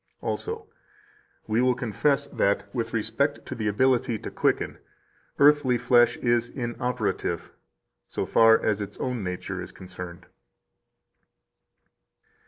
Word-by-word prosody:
Also: 445 -1 -4 0.8
"We 110 +2 +1
will 125 0 +3
confess 130 +4 +1
that, 100 0 0
with 115 -2 -2
respect 115 +6 -1
to - - -5
the 110 -2 -3
ability 125 +2 +2
to - - -7
quicken, - - 0 0.6
earthly 145 -3 +5
flesh 120 0 +4
is 120 -1 +1
inoperative, 120 -2 -2 0.6
so - - -3
far 115 -1 +6
as 105 -1 0
its 100 - -6
own 125 -4 -3
nature 90 -1 -4
is - - -8
concerned." 90 -2 -9
120 Hz, 115 wpm, -26 LUFS, 105-130 Hz, 0.8 s, far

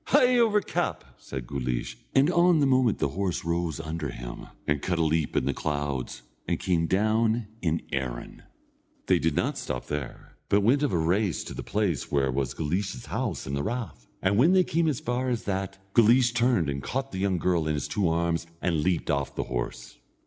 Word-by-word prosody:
"Hie 250 -3 +4
over 215 -3 +4
cap!" - - -2 0.2
said 65 -3 -6
Guleesh; 60 -2 -3 0.2
and 140 +5 +5
on 175 -1 +4
the 145 - +4
moment 130 -4 +3
the - - 0
horse 90 +1 -2
rose 85 -2 -1
under 80 -2 -4
him, - - -7 0.2
and 75 0 0
cut 90 +1 -1
a 85 - +2
leap 80 -1 0
in - - +2
the 70 - +1
clouds, 70 -4 -3 0.2
and - - 0
came 85 -3 +1
down 110 +4 +2 0.2
in 85 -2 0
Erin. 65 -4 -4 0.6
They - - +3
did 80 -2 0
not - - 0
stop 65 - -4
there, 75 -3 -6
but 100 - +4
went 125 +8 +3
of 145 - +1
a 90 - +1
race 90 +3 +1
to - - -7
the - - -5
place - - -1
where 70 -2 +2
was 65 -2 -2
Guleesh's 80 -3 -2
house - - -3
and 70 - -3
the 70 - -1
rath. 105 - -4 0.2
And 100 +1 +3
when 160 +9 +6
they 185 -1 +6
came 165 -1 +1
as 145 -5 0
far 125 +2 -1
as 120 -2 -1
that, 95 -1 -3 0.2
Guleesh 120 +1 +5
turned 120 - +2
and 70 0 -2
caught 135 - -3
the 95 - -4
young 95 -1 +1
girl 85 -2 +1
in 75 - +1
his 70 - -2
two 100 -5 +1
arms, 85 0 0
and 85 -4 0
leaped 90 +1 0
off 70 -1 -1
the - - -1
horse. - - -4
85 Hz, 205 wpm, -27 LUFS, 70-120 Hz, 0.6 s, when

